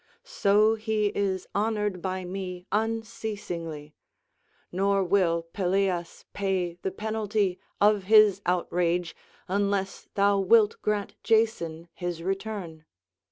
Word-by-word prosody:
So 215 - +3
he 215 -2 0
is 190 -2 -1
honoured 210 -3 -1
by 185 0 -3
me 180 -1 -6
unceasingly; 210 -8 -3 0.8
nor 195 +2 +2
will 175 -3 +2
Pelias 185 -2 -1
pay 190 -3 -1
the - - -1
penalty 210 -1 -1 0.2
of 205 -2 +3
his 210 -2 +6
outrage, 175 -1 0 0.3
unless 200 0 -1
thou 200 0 +3
wilt 210 +2 +4
grant 210 -1 -1
Jason 195 -8 +1
his 175 -2 -4
return." 190 -4 -4
195 Hz, 105 wpm, -27 LUFS, 180-210 Hz, 0.8 s, his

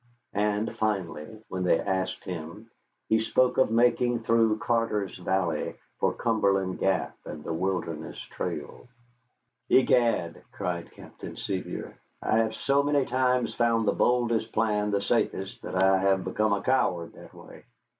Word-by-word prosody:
And 105 +1 0
finally, 105 -1 -3
when 95 0 -3
they 90 -2 +3
asked 95 -1 -2
him, 90 +5 -7 0.4
he 110 - +3
spoke 125 +4 +2
of 130 - +4
making 120 +1 +2
through 115 -1 +3
Carter's 115 -4 0
Valley 95 +1 -1 0.2
for - - +2
Cumberland 100 -5 +1
Gap 95 -2 0
and 75 -1 -8
the - - -3
Wilderness 85 -2 -3
Trail. - - -6 0.8
"Egad," 115 -10 +3
cried 85 -1 -3
Captain - - -10
Sevier, - - -5 0.2
"I 110 - +1
have 110 -1 0
so 140 +1 +2
many 145 -1 +2
times 125 -2 +1
found 115 -2 +2
the - - +5
boldest 120 -2 +1
plan 105 -2 +1
the 100 -1 0
safest 95 +1 -1
that - - -6
I 95 +1 +4
have 95 -1 +2
become 110 -1 +1
a 100 - -1
coward 90 -10 +1
that - - -14
way. - - -13
105 Hz, 145 wpm, -27 LUFS, 95-115 Hz, 0.8 s, the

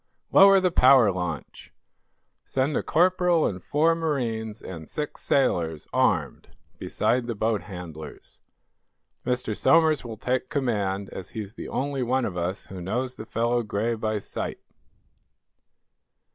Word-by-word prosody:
"Lower 195 0 +8
the 185 -1 +1
power 130 - +6
launch. 90 -2 -5 0.7
Send 135 +3 -1
a - - +1
corporal 180 -1 +3
and 90 -2 -3
four 160 +3 +2
marines, 120 -9 -2
and 80 -4 -9
six 150 -1 -5
sailors, 85 - 0
armed, - - +1 0.3
beside 120 0 0
the 115 - -3
boat 110 -1 0
handlers. 85 -5 -10 0.9
Mr. 125 -4 -1
Somers 160 +2 +4
will 115 -2 -7
take 130 +3 -1
command, 100 -8 -1
as 95 - -7
he's 105 -1 -5
the - - -8
only 140 0 -2
one 125 +1 +1
of 90 - -4
us 90 +2 -3
who 95 -2 -9
knows 125 +8 -2
the 110 - -10
fellow 120 +1 0
Gray 110 +1 -1
by 110 -1 -2
sight." 105 - -5
115 Hz, 135 wpm, -25 LUFS, 100-140 Hz, 0.9 s, Lower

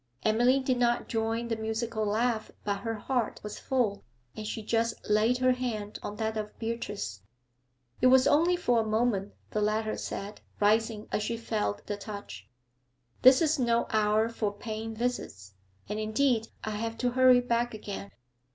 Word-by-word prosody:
Emily 245 +5 +4
did 260 -2 0
not 240 0 +2
join 225 +1 -1
the 230 - -1
musical 220 0 -2
laugh, 220 +1 0
but 200 -1 -1
her 225 +2 -3
heart 235 +1 -1
was 210 0 -6
full, 240 -6 0 0.3
and 215 -1 -5
she 220 0 -4
just 230 +1 +1
laid 215 +4 +3
her 255 0 +3
hand 230 -5 -3
on 205 - -5
that 220 0 -2
of 210 -1 -5
Beatrice. 100 - -4 0.8
'It 255 - +6
was 255 0 +6
only 335 +4 +4
for 245 -9 +2
a - - +2
moment,' 215 -2 0 0.2
the 215 - 0
latter 215 +1 0
said, 205 +1 -6 0.2
rising 215 +1 +2
as - - 0
she 230 +2 -2
felt 215 - -2
the 205 - -3
touch. 200 - -8 0.7
'This 260 +4 +7
is 310 -2 +2
no 235 -1 +2
hour 215 0 +3
for 225 -3 -2
paying 220 +1 -5
visits, 215 - -3 0.3
and, 210 +1 -3
indeed, 225 +1 +1 0.2
I 220 - -3
have 225 +2 -3
to 245 0 0
hurry 255 0 +6
back 240 -1 0
again. 200 -1 -6
225 Hz, 170 wpm, -29 LUFS, 210-240 Hz, 0.8 s, This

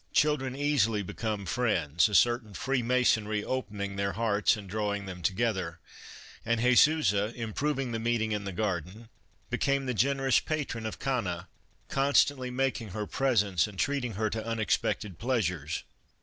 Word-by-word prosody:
Children 135 -4 +2
easily 135 -7 +1
become 105 +1 -4
friends, 90 - +1
a 105 - -1
certain 120 -3 +3
free 135 -1 0
masonry 110 -4 +2
open 105 -6 -3
ing 100 0 -3
their 100 0 -1
hearts 110 -1 +2
and 100 -2 -9
drawing 105 0 -2
them 90 -2 -7
together, 95 -3 -1 0.7
and 115 0 0
Jesusa, 125 -4 +4
improving 130 +3 -2
the 115 - -2
meeting 115 -1 0
in 105 -1 -1
the 100 - -4
garden, 95 +2 -3 0.4
became 140 0 +1
the 125 - -1
generous 135 +3 +2
patron 135 -8 -3
of 110 - -6
Cana, 95 -10 -2 0.4
constantly 135 -1 +2
making 125 -2 -1
her 105 +2 -4
presents 105 - +1
and 105 -2 -11
treating 135 -1 -1
her 110 +2 -1
to 110 0 -3
unexpected 110 -4 -1
pleasures. 90 - -1
110 Hz, 150 wpm, -29 LUFS, 100-130 Hz, 0.7 s, Jesusa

